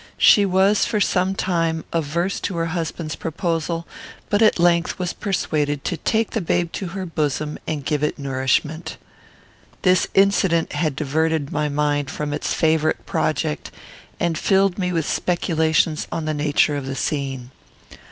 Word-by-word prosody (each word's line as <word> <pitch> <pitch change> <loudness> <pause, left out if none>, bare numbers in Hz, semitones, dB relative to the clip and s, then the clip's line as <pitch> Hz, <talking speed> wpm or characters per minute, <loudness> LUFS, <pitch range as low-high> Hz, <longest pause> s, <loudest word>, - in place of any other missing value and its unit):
She 205 -2 +6
was, 190 +2 +3
for 220 -3 0
some 190 -1 +1
time, 165 -4 0
averse 170 +4 -1
to 190 - -3
her 165 -1 -1
husband's 165 -2 -3
proposal, 165 0 -2 0.5
but 205 +1 +3
at 220 - +5
length 170 0 +2
was 180 -1 -2
persuaded 150 -8 -1
to - - -1
take 220 +6 0
the 225 - -1
babe 170 0 0
to 190 - -4
her 190 - -3
bosom 150 -2 -2
and 145 -4 -3
give 150 -1 0
it 150 - 0
nourishment. 140 +4 -1 0.9
This 185 -1 +4
incident 195 -4 +3
had 150 -1 0
diverted 155 0 0
my 150 0 0
mind 145 -1 0
from 150 0 -3
its 150 - -2
favourite 160 -1 +1
project, 75 - -1 0.5
and 170 -2 0
filled 195 -1 +2
me 180 -1 0
with 165 -3 0
speculations 160 -2 +1
on 165 - -3
the 155 - -1
nature 150 0 +2
of 140 -2 -4
the 135 - -3
scene. 135 -3 -3
160 Hz, 155 wpm, -22 LUFS, 150-180 Hz, 0.9 s, She